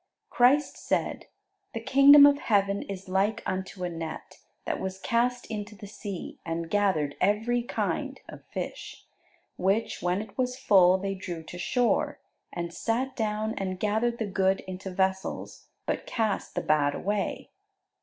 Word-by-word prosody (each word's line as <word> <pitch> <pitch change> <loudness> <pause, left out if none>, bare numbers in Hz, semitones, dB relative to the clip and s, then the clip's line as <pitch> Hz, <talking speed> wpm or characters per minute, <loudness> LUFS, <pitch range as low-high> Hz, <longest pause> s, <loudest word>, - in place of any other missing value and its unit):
Christ 270 +5 +3
said, - - -2 0.5
"The - - -1
kingdom 280 +1 +8
of 285 0 +5
heaven 200 -4 +1
is 195 -1 -7
like 200 +4 0
unto 185 0 -4
a 180 - -1
net, 165 -1 -7 0.3
that - - -2
was 190 0 -4
cast 245 +3 0
into 210 -1 -6
the 205 - -10
sea, 200 -2 -7
and 165 0 -4
gathered 185 -9 +1
every 220 +5 +2
kind 240 - -2
(of - - -11
fish): - - -7 0.5
which, 195 +5 0
when 180 +2 +1
it 210 -1 -8
was 250 0 0
full, 185 -6 +5
they 195 +1 -3
drew 175 -4 -6
to 175 +2 -9
shore, 245 +6 +1 0.3
and 170 -1 -4
sat 250 +7 -1
down, 215 -1 -1
and 185 -1 -3
gathered 220 +3 0
the 225 - -2
good 190 -1 +1
into 190 +1 -7
vessels, 190 +1 -2 0.2
but - - -2
cast 220 -4 -1
the - - 0
bad 145 -2 +2
away. 205 +1 -2
200 Hz, 155 wpm, -28 LUFS, 185-225 Hz, 0.5 s, kingdom